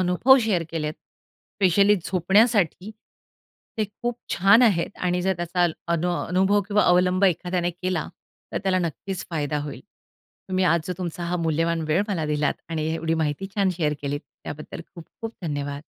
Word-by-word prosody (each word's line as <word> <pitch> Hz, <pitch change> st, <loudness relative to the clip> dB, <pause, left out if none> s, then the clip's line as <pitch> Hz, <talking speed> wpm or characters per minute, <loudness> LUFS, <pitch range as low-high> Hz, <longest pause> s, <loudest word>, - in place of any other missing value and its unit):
अनुभव 185 Hz, +9 st, +5 dB
शेअर 190 Hz, -6 st, +1 dB
केलेत, 155 Hz, -2 st, -2 dB
स्पेशली 200 Hz, +4 st, 0 dB
झोपण्यासाठी, 195 Hz, +1 st, +2 dB, 0.9 s
ते 215 Hz, -, +2 dB
खूप 235 Hz, +4 st, -5 dB, 0.2 s
छान 200 Hz, +6 st, +6 dB
आहेत 200 Hz, -4 st, +2 dB
आणि 180 Hz, 0 st, 0 dB
जर 190 Hz, -, +2 dB
त्याचा 175 Hz, +1 st, +1 dB, 0.3 s
अनो 175 Hz, +2 st, 0 dB
अनुभव 190 Hz, +3 st, +2 dB
किंवा 210 Hz, 0 st, +3 dB
अवलंब 180 Hz, +2 st, +3 dB
एखाद्याने 180 Hz, -1 st, +1 dB
केला, 180 Hz, -1 st, -3 dB, 0.5 s
तर -, -, -1 dB
त्याला 190 Hz, -1 st, +2 dB
नक्कीच 180 Hz, +2 st, -4 dB
फायदा 150 Hz, -2 st, -1 dB
होईल. 145 Hz, -2 st, -7 dB, 0.7 s
तुम्ही 185 Hz, 0 st, +1 dB
आज 170 Hz, 0 st, +3 dB
जो 180 Hz, -, -2 dB
तुमचा 175 Hz, -1 st, -4 dB
हा 175 Hz, +1 st, -1 dB
मूल्यवान 165 Hz, +1 st, 0 dB
वेळ 165 Hz, +6 st, +3 dB
मला 170 Hz, -7 st, -1 dB
दिलात 150 Hz, -1 st, 0 dB
आणि 155 Hz, -1 st, -2 dB
एवढी 165 Hz, 0 st, -1 dB
माहिती 150 Hz, +5 st, -2 dB
छान 195 Hz, -2 st, +2 dB
शेअर 150 Hz, -4 st, 0 dB
केली, 145 Hz, 0 st, -2 dB
त्याबद्दल 150 Hz, +1 st, -9 dB
खूप-खूप 210 Hz, +6 st, -9 dB
धन्यवाद. 145 Hz, -2 st, -4 dB
180 Hz, 155 wpm, -24 LUFS, 160-195 Hz, 0.9 s, छान